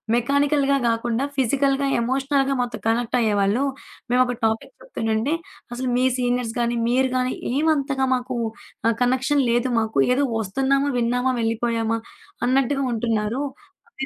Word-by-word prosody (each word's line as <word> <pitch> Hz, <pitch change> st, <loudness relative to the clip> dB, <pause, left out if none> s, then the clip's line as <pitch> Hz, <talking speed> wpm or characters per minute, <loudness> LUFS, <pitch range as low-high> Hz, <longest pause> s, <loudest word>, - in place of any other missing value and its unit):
మెకానికల్‌గా 280 Hz, +3 st, +2 dB
కాకుండా 230 Hz, +2 st, 0 dB
ఫిజికల్‌గా, 275 Hz, +2 st, +1 dB
ఎమోషనల్‌గా 270 Hz, +2 st, +1 dB
మాతో 245 Hz, -1 st, -3 dB
కనెక్టయ్యేవాళ్ళు. 225 Hz, -1 st, +1 dB, 0.5 s
మేమొక 250 Hz, -1 st, +3 dB
టాపిక్ 220 Hz, -, -1 dB
చెప్తుండంటే 230 Hz, -, -1 dB, 0.4 s
అసలు 255 Hz, +1 st, -3 dB
మీ 255 Hz, -, +2 dB
సీనియర్స్ 245 Hz, -2 st, 0 dB
గాని, 235 Hz, 0 st, 0 dB
మీరు 260 Hz, +1 st, +2 dB
గాని 255 Hz, 0 st, 0 dB, 0.2 s
ఏమంతగా 280 Hz, -2 st, +1 dB
మాకు 250 Hz, 0 st, -4 dB, 0.5 s
ఆహ్, 230 Hz, -, +2 dB
కనెక్షన్ 260 Hz, +3 st, +2 dB
లేదు 240 Hz, +2 st, +1 dB
మాకు. 220 Hz, -5 st, -2 dB, 0.2 s
ఏదో 280 Hz, +3 st, +2 dB, 0.2 s
ఒస్తున్నామా, 270 Hz, +7 st, +1 dB
విన్నామా, 245 Hz, +2 st, +1 dB
వెళ్ళిపోయామా. 225 Hz, 0 st, 0 dB, 0.5 s
అన్నట్టుగా 270 Hz, +2 st, +1 dB
ఉంటున్నారు. 225 Hz, +2 st, -1 dB, 0.5 s
ఆహ్, 270 Hz, -12 st, -5 dB
250 Hz, 120 wpm, -23 LUFS, 230-275 Hz, 0.5 s, మేమొక